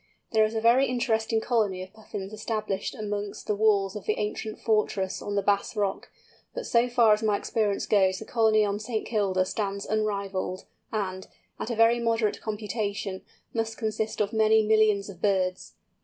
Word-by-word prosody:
There 220 Hz, -2 st, +4 dB
is 215 Hz, +1 st, -4 dB
a 220 Hz, -, 0 dB
very 245 Hz, +4 st, +5 dB
interesting 225 Hz, -3 st, 0 dB
colony 210 Hz, -7 st, 0 dB
of 185 Hz, -, -13 dB
Puffins 210 Hz, -2 st, -7 dB
established 215 Hz, -2 st, -3 dB
amongst 205 Hz, -2 st, -4 dB
the -, -, 0 dB
walls 200 Hz, -2 st, +2 dB
of 210 Hz, -, -7 dB
the 215 Hz, -, 0 dB
ancient 215 Hz, +1 st, -3 dB
fortress 210 Hz, -3 st, 0 dB
on 205 Hz, -, -4 dB
the 200 Hz, -, +1 dB
Bass 200 Hz, 0 st, +1 dB
Rock, 200 Hz, -2 st, -2 dB, 0.5 s
but -, -, -4 dB
so 240 Hz, -, +2 dB
far 235 Hz, -3 st, +5 dB
as 210 Hz, -, 0 dB
my 210 Hz, -2 st, +2 dB
experience 210 Hz, -2 st, -1 dB
goes 190 Hz, -3 st, +3 dB
the 220 Hz, -, -8 dB
colony 220 Hz, -2 st, +3 dB
on 200 Hz, 0 st, -1 dB
St. 220 Hz, 0 st, -3 dB
Kilda 195 Hz, -4 st, +1 dB
stands 200 Hz, 0 st, -3 dB
unrivalled, 200 Hz, -3 st, -2 dB, 0.3 s
and, 190 Hz, -3 st, -3 dB, 0.3 s
at -, -, -4 dB
a 235 Hz, -, -1 dB
very 230 Hz, +2 st, +4 dB
moderate 230 Hz, -2 st, 0 dB
computation, 205 Hz, -2 st, -3 dB, 0.3 s
must 225 Hz, -1 st, -2 dB
consist 220 Hz, -1 st, -2 dB
of 210 Hz, +1 st, -1 dB
many 220 Hz, 0 st, +4 dB
millions 215 Hz, -2 st, +3 dB
of 185 Hz, -4 st, -11 dB
birds! 185 Hz, -2 st, 0 dB
215 Hz, 175 wpm, -27 LUFS, 200-220 Hz, 0.5 s, very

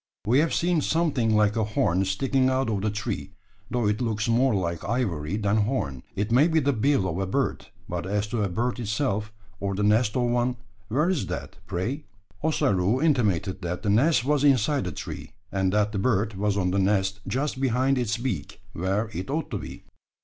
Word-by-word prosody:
We 120 Hz, +6 st, +4 dB
have 160 Hz, +1 st, +2 dB
seen 170 Hz, -2 st, +1 dB
something 140 Hz, -10 st, +1 dB
like 105 Hz, 0 st, +3 dB
a 110 Hz, -, +1 dB
horn 100 Hz, -3 st, +1 dB
sticking 130 Hz, +7 st, +1 dB
out 130 Hz, -3 st, +1 dB
of 100 Hz, -2 st, -1 dB
the 110 Hz, -, +1 dB
tree, 105 Hz, -1 st, -4 dB, 0.4 s
though 120 Hz, -3 st, 0 dB
it 105 Hz, +3 st, 0 dB
looks 110 Hz, -2 st, -1 dB
more 120 Hz, +1 st, +3 dB
like 85 Hz, -3 st, -2 dB
ivory 100 Hz, -8 st, -1 dB
than 105 Hz, 0 st, +1 dB
horn. 100 Hz, -, -1 dB
It 105 Hz, +3 st, -2 dB
may 135 Hz, +7 st, +5 dB
be 160 Hz, -1 st, +3 dB
the 140 Hz, -1 st, +1 dB
bill 120 Hz, -3 st, +2 dB
of 90 Hz, 0 st, -2 dB
a 95 Hz, -, -1 dB
bird; 135 Hz, +8 st, -1 dB, 0.2 s
but 90 Hz, +1 st, -4 dB
as 105 Hz, +1 st, 0 dB
to 115 Hz, 0 st, -1 dB
a 100 Hz, -, 0 dB
bird 120 Hz, +7 st, -1 dB
itself, 105 Hz, -2 st, -1 dB, 0.3 s
or 100 Hz, -1 st, -2 dB
the 105 Hz, -, -1 dB
nest 105 Hz, +1 st, +3 dB
of 125 Hz, -, +2 dB
one, 120 Hz, +1 st, +1 dB, 0.3 s
where 145 Hz, +10 st, +1 dB
is 180 Hz, -7 st, 0 dB
that, -, -, -6 dB
pray?" 120 Hz, -, -3 dB, 0.4 s
Ossaroo 105 Hz, -, +2 dB
intimated 105 Hz, -, +1 dB
that 90 Hz, +3 st, -4 dB
the 105 Hz, -, +1 dB
nest 125 Hz, +4 st, +3 dB
was 145 Hz, 0 st, +2 dB
inside 140 Hz, 0 st, +3 dB
the 90 Hz, -, -3 dB
tree; -, -, -7 dB, 0.2 s
and 95 Hz, -1 st, +1 dB
that 105 Hz, +1 st, +2 dB
the 105 Hz, -, -2 dB
bird 110 Hz, -1 st, +1 dB
was 100 Hz, +1 st, 0 dB
on 90 Hz, -2 st, +1 dB
the 100 Hz, -, +1 dB
nest 95 Hz, 0 st, +1 dB
just 135 Hz, 0 st, -2 dB
behind 130 Hz, +1 st, +2 dB
its 115 Hz, -2 st, 0 dB
beak, 120 Hz, -3 st, -4 dB
where 95 Hz, +5 st, -1 dB
it 95 Hz, +5 st, -5 dB
ought 155 Hz, +3 st, -2 dB
to -, -, -2 dB
be. -, -, -9 dB
110 Hz, 205 wpm, -26 LUFS, 100-130 Hz, 0.4 s, may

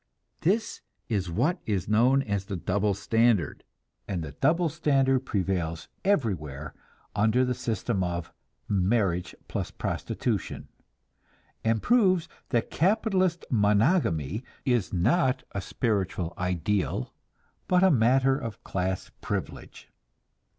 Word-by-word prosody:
This 210 Hz, +7 st, 0 dB, 0.3 s
is 100 Hz, -5 st, -1 dB
what 130 Hz, -, +1 dB
is 100 Hz, -4 st, -1 dB
known 125 Hz, +6 st, +4 dB
as 100 Hz, -4 st, -2 dB
the 100 Hz, -, -4 dB
"double 100 Hz, +3 st, 0 dB
standard," 115 Hz, -3 st, +1 dB, 0.4 s
and 90 Hz, -5 st, -2 dB
the 75 Hz, -, -6 dB
double 170 Hz, -, +2 dB
standard 135 Hz, -3 st, +1 dB
prevails 90 Hz, -5 st, -1 dB
everywhere 80 Hz, -, -1 dB, 0.4 s
under 110 Hz, +5 st, +3 dB
the 125 Hz, -, 0 dB
system 115 Hz, -4 st, -1 dB
of 85 Hz, -1 st, -3 dB, 0.3 s
marriage 95 Hz, -2 st, +1 dB
plus -, -, -3 dB
prostitution, -, -, -3 dB, 0.9 s
and 115 Hz, -1 st, +1 dB
proves 185 Hz, -8 st, +3 dB, 0.2 s
that 120 Hz, -3 st, 0 dB
capitalist 185 Hz, -1 st, +1 dB
"monogamy" 105 Hz, -, +2 dB, 0.2 s
is 120 Hz, -7 st, +1 dB
not 130 Hz, -, +2 dB
a 100 Hz, -, -3 dB
spiritual 95 Hz, -7 st, -1 dB
ideal, 90 Hz, -5 st, -1 dB, 0.5 s
but 180 Hz, 0 st, +4 dB
a 190 Hz, -, +6 dB
matter 130 Hz, +1 st, +4 dB
of 115 Hz, -7 st, -6 dB
class 95 Hz, 0 st, -2 dB
privilege. -, -, -5 dB
110 Hz, 110 wpm, -27 LUFS, 95-135 Hz, 0.9 s, a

